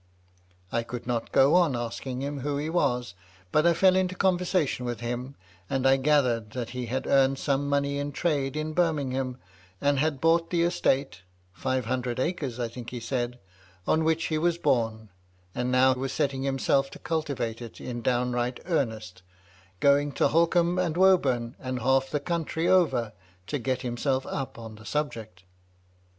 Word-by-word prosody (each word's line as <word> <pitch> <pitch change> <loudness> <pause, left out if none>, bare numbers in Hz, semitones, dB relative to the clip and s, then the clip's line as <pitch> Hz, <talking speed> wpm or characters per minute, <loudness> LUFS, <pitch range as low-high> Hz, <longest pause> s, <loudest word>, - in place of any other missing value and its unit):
I 115 - +1
could 120 +1 -7
not 120 -2 -2
go 135 +3 +5
on 175 -7 +4
asking 125 +2 -4
him 140 0 -3
who 140 +2 -2
he 150 +2 -2
was; 125 - 0 0.4
but 155 +2 +4
I 170 - +4
fell 185 +2 +5
into 185 -1 +1
conversation 180 -7 +1
with 120 -3 -3
him, 120 +3 -4 0.3
and 135 -1 -1
I 135 0 +6
gathered 130 -6 +1
that 120 -2 -4
he 125 -1 -4
had 130 +3 -2
earned 135 0 +3
some 140 0 0
money 140 0 0
in 145 0 -3
trade 145 -3 -1
in 155 0 -3
Birmingham, 135 -7 0 0.4
and 140 +3 +2
had 150 -1 0
bought 165 +2 +3
the 170 -1 +1
estate 135 - 0 0.3
(five 130 +7 -1
hundred 125 0 -2
acres, 140 -5 -2
I 120 - 0
think 120 +1 -8
he 125 - -6
said,) 120 +1 -2 0.5
on 160 - +2
which 160 +1 +1
he 155 -1 0
was 170 +1 +1
bom, 115 -9 0 0.4
and 125 0 -1
now 130 +1 +5
was 130 +1 -3
setting 135 -2 -1
himself 135 0 +1
to - - -11
cultivate 140 -8 -3
it 115 -2 -9
in 120 -1 -5
downright 125 0 0
earnest, 110 - -2 0.6
going 140 0 +4
to - - +2
Holkham 170 +2 +3
and 170 -3 0
Woburn, 135 -11 +3
and 130 0 -4
half 135 +2 +2
the 150 - -1
country 165 +1 -2
over, 135 -12 +3 0.3
to 145 +8 -3
get 130 +1 -2
himself 130 +2 -1
up 135 -3 -4
on 115 -2 -9
the 110 - -14
subject." 115 -11 -4
135 Hz, 170 wpm, -27 LUFS, 125-155 Hz, 0.6 s, I